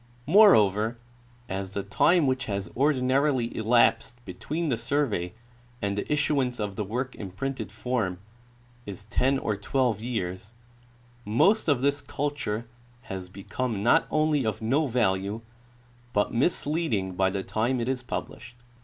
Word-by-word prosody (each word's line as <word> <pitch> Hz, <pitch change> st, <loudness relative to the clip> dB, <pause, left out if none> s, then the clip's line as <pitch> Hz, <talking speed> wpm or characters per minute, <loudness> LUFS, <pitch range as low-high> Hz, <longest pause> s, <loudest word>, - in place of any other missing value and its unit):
Moreover, 115 Hz, -, +5 dB, 0.5 s
as 95 Hz, -1 st, -4 dB
the 100 Hz, -, -1 dB
time 155 Hz, -, +3 dB
Avhich 130 Hz, 0 st, 0 dB
has 100 Hz, -3 st, -4 dB
ordinarily 130 Hz, -2 st, +1 dB
elapsed 120 Hz, +1 st, +2 dB
between 160 Hz, +2 st, -3 dB
the 125 Hz, -, +2 dB
survey 115 Hz, -7 st, -1 dB, 0.5 s
and 100 Hz, -4 st, -1 dB
the 105 Hz, -, -4 dB
issuance 140 Hz, -4 st, +1 dB
of 105 Hz, -2 st, -3 dB
the 105 Hz, -, -2 dB
work 125 Hz, +6 st, -3 dB
in 100 Hz, -, -7 dB
printed 110 Hz, +1 st, -4 dB
form 110 Hz, -5 st, -2 dB, 0.7 s
is 100 Hz, -1 st, -6 dB
ten 135 Hz, +3 st, +2 dB
or 105 Hz, -5 st, -1 dB
twelve 115 Hz, +1 st, 0 dB
years, 105 Hz, -3 st, -4 dB, 0.7 s
most 180 Hz, -, +3 dB
of 140 Hz, -5 st, +2 dB
this 140 Hz, +1 st, +1 dB
culture 140 Hz, -6 st, -3 dB, 0.5 s
has 95 Hz, -1 st, -6 dB
become 100 Hz, +3 st, -4 dB
not 120 Hz, -, +4 dB
only 155 Hz, -2 st, +2 dB
of 110 Hz, -3 st, -2 dB
no 135 Hz, +7 st, +1 dB
value 105 Hz, -3 st, 0 dB, 0.7 s
but 105 Hz, -, +1 dB
misleading 135 Hz, -, 0 dB
by 95 Hz, +1 st, +2 dB
the 95 Hz, 0 st, -3 dB
time 120 Hz, +6 st, 0 dB
it 115 Hz, -, -2 dB
is 130 Hz, -1 st, -1 dB
published. 125 Hz, -1 st, -6 dB
120 Hz, 140 wpm, -27 LUFS, 100-135 Hz, 0.7 s, Moreover